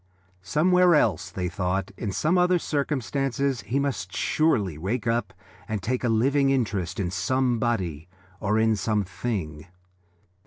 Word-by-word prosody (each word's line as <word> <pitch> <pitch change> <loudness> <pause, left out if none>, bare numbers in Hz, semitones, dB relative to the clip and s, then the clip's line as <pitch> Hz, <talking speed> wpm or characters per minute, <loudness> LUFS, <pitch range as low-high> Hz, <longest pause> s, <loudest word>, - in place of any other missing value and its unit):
Somewhere 175 - +4
else, 95 - +1
they 90 0 -3
thought, 90 +2 -2
in 105 - -4
some 155 - +1
other 180 0 +4
circumstances, 135 - -1
he 110 +8 -2
must 120 -11 -2
surely 110 - +1
wake 105 +10 -3
up 115 +1 0 0.4
and 110 -1 -2
take 125 +5 -2
a 120 - +1
living 135 +5 +3
interest 105 -10 -1
in 90 -3 -1
somebody 110 - 0 0.3
or 105 +1 0
in 110 0 +3
something. 100 -6 -3
110 Hz, 130 wpm, -25 LUFS, 95-135 Hz, 0.4 s, Somewhere